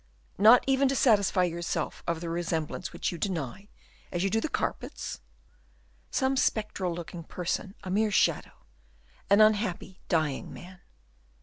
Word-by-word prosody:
"Not 225 +5 +8
even 270 0 +3
to 270 - 0
satisfy 200 -7 +3
yourself 170 -1 -2
of 170 -1 -1
the 170 - -4
resemblance 165 -2 -3
which - - -2
you 170 - -7
deny, 180 - -3 0.4
as 175 0 -1
you 195 - 0
do 225 +1 +1
the - - -2
carpets?" - - -4 0.9
"Some 265 +1 +1
spectral 210 -7 0
looking 170 0 -7
person, 180 +4 -4
a 185 - -5
mere 215 +3 +2
shadow; 200 - 0 0.6
an 200 +2 +6
unhappy, 210 -4 +1
dying 155 -5 0
man." 180 +1 -11
185 Hz, 140 wpm, -28 LUFS, 170-215 Hz, 0.9 s, Not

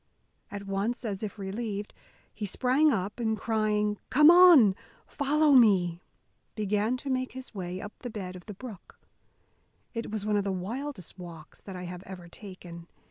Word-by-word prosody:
At 200 0 -7
once, 200 +6 -2
as 200 -3 -3
if 215 0 -5
relieved, 205 +1 -4 0.4
he 210 -1 -4
sprang 260 +9 +3
up, 205 0 -2
and 220 -2 0
crying, 210 -2 0
"Come 300 +4 +7
on, 345 - +8 0.3
follow 300 +1 +2
me!" 185 -9 +5 0.5
began 210 +3 0
to 275 - -7
make 255 0 -1
his 260 -1 -9
way 185 -2 -5
up 205 +1 -8
the 245 - -6
bed 190 -5 -6
of 180 +1 -12
the 210 - -7
brook. 220 -4 -11 0.9
It 230 -1 -4
was 210 -1 -3
one 210 -1 +1
of 200 - +1
the 195 - -1
wildest 200 - -5
walks 165 -3 -11
that 195 - -9
I 180 - -6
have 180 0 -7
ever 180 -2 -9
taken. 175 -2 -11
210 Hz, 170 wpm, -28 LUFS, 190-245 Hz, 0.9 s, on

